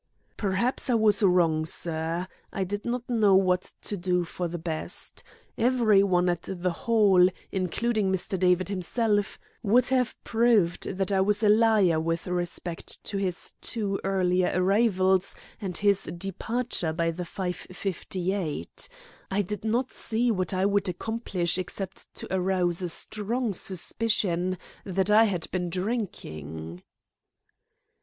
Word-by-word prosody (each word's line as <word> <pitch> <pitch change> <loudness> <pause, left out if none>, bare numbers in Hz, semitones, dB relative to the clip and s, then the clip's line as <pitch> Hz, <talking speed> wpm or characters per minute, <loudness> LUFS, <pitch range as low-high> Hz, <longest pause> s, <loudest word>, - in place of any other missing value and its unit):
"Perhaps 220 +7 0
I 245 - +4
was 215 -2 +4
wrong, 175 -5 +3
sir. 165 +2 -1 0.2
I 195 - -2
did 205 +2 -4
not 240 0 -2
know 215 -5 +4
what 185 -1 +2
to 205 - -3
do 180 -1 0
for 175 +1 -4
the 170 +1 -5
best. 160 -1 -4 0.4
Every 230 -4 +4
one 180 -2 +2
at 175 -1 -1
the 180 -1 -1
Hall, 195 -2 +4 0.2
including 200 +2 0
Mr. 190 0 -1
David 180 0 +3
himself, 205 +2 0 0.2
would 235 +5 +3
have 255 -2 +1
proved 225 -7 +2
that 195 0 -1
I 190 -1 +3
was 205 +2 +2
a 210 - +5
liar 210 -6 +4
with 165 +1 -2
respect 175 -1 -4
to 200 - -3
his 190 -2 -2
two 200 -4 -1
earlier 185 -2 +2
arrivals 190 -1 +2 0.3
and 185 -4 -1
his 200 -2 +3
departure 195 0 -2
by 165 0 0
the 170 +2 -6
5.58. 180 - -4 0.4
I 195 +2 +1
did 210 +3 -5
not 240 +4 0
see 230 +2 0
what 185 -4 -1
I 190 0 +1
would 200 -1 +2
accomplish 185 -2 -1
except 190 +1 -6
to - - -6
arouse 180 -2 +1
a 180 - -2
strong 220 +6 -2
suspicion 185 -1 0 0.3
that 190 +1 0
I 220 +2 +7
had 185 -6 -1
been 180 -1 -1
drinking." 90 - -4
190 Hz, 135 wpm, -27 LUFS, 180-210 Hz, 0.4 s, I